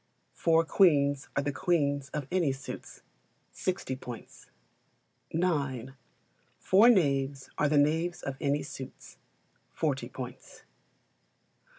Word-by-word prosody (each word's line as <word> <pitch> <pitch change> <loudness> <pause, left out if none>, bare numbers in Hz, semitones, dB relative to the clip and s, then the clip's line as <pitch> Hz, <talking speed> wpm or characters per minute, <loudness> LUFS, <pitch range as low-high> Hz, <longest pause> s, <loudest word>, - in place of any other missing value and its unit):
Four 165 0 +3
Queens 145 -7 +3
are 140 - +1
the 145 - -1
queens 140 -2 0
of 150 -2 -4
any 175 -6 +2
suits 135 +1 -9 0.5
60 180 -8 -3
points. 125 -3 -10 0.8
ix. 140 -7 -1 0.7
Four 205 +6 +5
knaves 140 - +2
are 150 - +3
the 150 - +3
knaves 160 +4 +1
of 135 - -3
any 145 +1 +1
suits 130 - -10 0.6
40 - - -1
points. - - -9
145 Hz, 105 wpm, -29 LUFS, 135-170 Hz, 0.8 s, Four